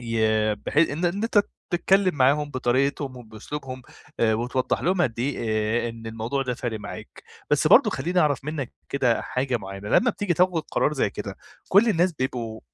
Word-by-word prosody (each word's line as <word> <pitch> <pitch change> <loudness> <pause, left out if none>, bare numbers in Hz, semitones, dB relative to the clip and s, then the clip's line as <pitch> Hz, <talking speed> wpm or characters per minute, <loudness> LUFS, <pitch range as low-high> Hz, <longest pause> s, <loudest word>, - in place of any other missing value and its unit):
ي 110 -2 +1
بحي 145 +8 +1
إن 165 +4 -3
إن 195 +5 0
أنتَ 210 -3 +3 0.3
تتكلّم 185 +1 +2
معاهم 145 +2 +2
بطريقتهم 130 +1 0
وبأسلوبهم، 130 +4 -8 0.4
آآ 110 -1 +3
وتوضّح 125 +2 -1
لهم 180 +4 +2
قد 115 -7 -1
إيه 135 +3 -1 0.5
آآ - - -2
إن 115 -1 -9
الموضوع 115 +5 -2
ده 125 -2 -2
فارق 115 -4 -4
معاك، - - -9 0.3
بس - - +3
برضه - - +6
خلّيني 175 +6 0
أعرف 145 -5 +1
منّك 150 -4 -4 0.2
كده 125 -4 +1
حاجة 130 -1 -1
معيّنة 100 0 -7
لمّا 240 - +4
بتيجي 200 -4 -1
تاخد 180 -2 +2
قرار 150 - +1
زي 130 -8 0
كده - - -6 0.3
كلّ 205 +5 +5
الناس 180 -3 +2
بيبقوا 125 -5 -4
130 Hz, 175 wpm, -24 LUFS, 115-165 Hz, 0.5 s, برضه